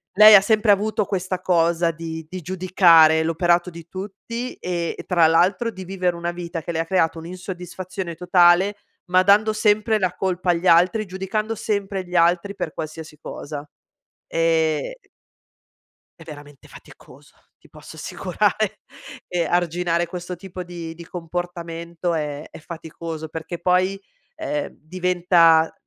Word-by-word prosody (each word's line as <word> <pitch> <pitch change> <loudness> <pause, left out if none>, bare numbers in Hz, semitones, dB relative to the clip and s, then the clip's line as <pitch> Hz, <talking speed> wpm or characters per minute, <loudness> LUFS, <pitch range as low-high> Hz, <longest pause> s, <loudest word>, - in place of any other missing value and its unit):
lei 215 +1 +10
ha 195 - +8
sempre 210 +1 +3
avuto 210 +2 +1
questa 185 -1 -3
cosa 170 -1 +2
di 160 -1 -7
di 185 +1 -6
giudicare 170 -3 +5
l'operato 175 +2 +1
di 170 -1 -12
tutti 210 +6 -6
e 170 -2 -4
tra 175 -3 +4
l'altro 185 +7 +2
di 190 -4 -8
vivere 180 -1 -1
una 170 0 -3
vita 175 -1 -6
che 170 - -5
le 160 - -2
ha 165 - 0
creato 165 -2 +1
un'insoddisfazione 180 +1 -7
totale, 180 +3 +4 0.3
ma 185 0 +5
dando 205 +3 +4
sempre 215 0 +2
la 185 -2 0
colpa 185 -1 0
agli 175 +2 -1
altri, 180 +6 +4
giudicando 195 +4 -3
sempre 200 -3 -3
gli 180 0 -8
altri 175 +4 +2
per 160 - -4
qualsiasi 155 -1 -7
cosa. 145 -1 -8 0.6
Ehm 165 - +1 1.3
è - - -11
veramente 145 -2 -12
faticoso, - - -16 0.3
ti - - -21
posso - - -13
assicurare. - - -1 0.5
E 175 -1 0
arginare 175 +1 0
questo 180 +1 -6
tipo 180 0 -8
di 170 -2 -7
di 170 - -10
comportamento 170 0 -5
è 150 -2 -3
è - - -11
faticoso 160 -1 -7
perché 160 +2 -7
poi, 185 +2 +2 0.4
ehm 295 -9 -3
diventa 175 -1 +3
175 Hz, 140 wpm, -22 LUFS, 165-190 Hz, 1.3 s, lei